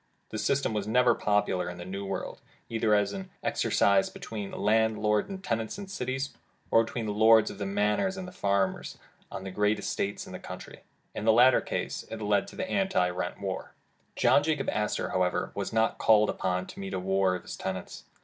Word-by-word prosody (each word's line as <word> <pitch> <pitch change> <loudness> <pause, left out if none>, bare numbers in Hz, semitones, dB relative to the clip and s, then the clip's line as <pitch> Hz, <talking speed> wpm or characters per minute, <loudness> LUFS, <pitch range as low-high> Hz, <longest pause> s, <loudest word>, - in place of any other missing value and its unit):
The 110 - -3
system 140 0 +1
was 105 -1 -2
never 125 +3 +4
popular 105 -4 0
in 90 - -7
the 85 - -7
new 100 +1 -5
world, 95 0 -5 0.3
either 110 -2 +2
as 105 - +1 0.3
exercised 100 -1 +2
between 105 -3 -6
landlord 105 - +2
and 190 -1 -7
tenant 115 - -2
in 200 - -6
the 195 - -11
cities, 135 -4 -3 0.4
or 115 - +6
between 115 0 -4
Lords 110 +1 +5
of 100 - -11
the 100 - -2
Manors 105 - +1
and 185 -1 -5
the - - -8
farmers 100 - -1 0.3
on 95 - -6
their 95 -1 -6
great 105 +2 +2
estates 100 0 -3
in - - -10
the - - -6
country. - - -9 0.3
In - - -5
the 110 - +6
latter 125 +3 +6
case - - -3
it 115 - -6
led 105 -2 +1
to - - -11
the 185 - -3
Anti 190 - +1
rent 90 0 -4
War. 95 -2 -5 0.4
John - - +4
Jacob 145 -2 0
Astor, 105 0 -1
however, 90 -1 0
was 100 -1 -3
not 110 0 +1
called 105 -1 +5
upon 90 0 -1
to - - -11
meet 95 0 -4
a - - -1
war 95 0 +2
of 90 - -7
his - - -7
tenants. 95 -1 -5
105 Hz, 200 wpm, -28 LUFS, 95-115 Hz, 0.4 s, or